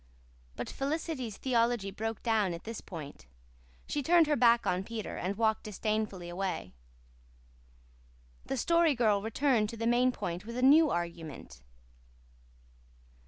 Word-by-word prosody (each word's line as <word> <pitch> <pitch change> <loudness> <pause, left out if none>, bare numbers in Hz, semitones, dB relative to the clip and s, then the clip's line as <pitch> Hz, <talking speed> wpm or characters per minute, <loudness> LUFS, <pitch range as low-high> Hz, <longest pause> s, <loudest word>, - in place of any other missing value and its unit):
But - - -5
Felicity's 275 - -3
theology 235 -5 +1
broke 225 +2 -4
down 215 -6 +1
at 170 - -10
this 230 0 -6
point. 145 - -9 0.6
She 295 - -1
turned 335 +3 +5
her 300 -1 +1
back 235 -3 +4
on 180 +1 0
Peter 220 0 -5
and 195 +3 -3
walked 220 -1 +2
disdainfully 215 -3 -3
away. 180 - -4 1.7
The 270 - -2
Story 335 +1 +3
Girl 215 -4 +2
returned 225 0 +1
to 230 - -7
the 230 - -3
main 245 +2 +3
point 175 -6 -5
with 235 +3 -7
a 250 - -1
new 300 +4 +7
argument. 165 - -5
225 Hz, 135 wpm, -31 LUFS, 195-255 Hz, 1.7 s, new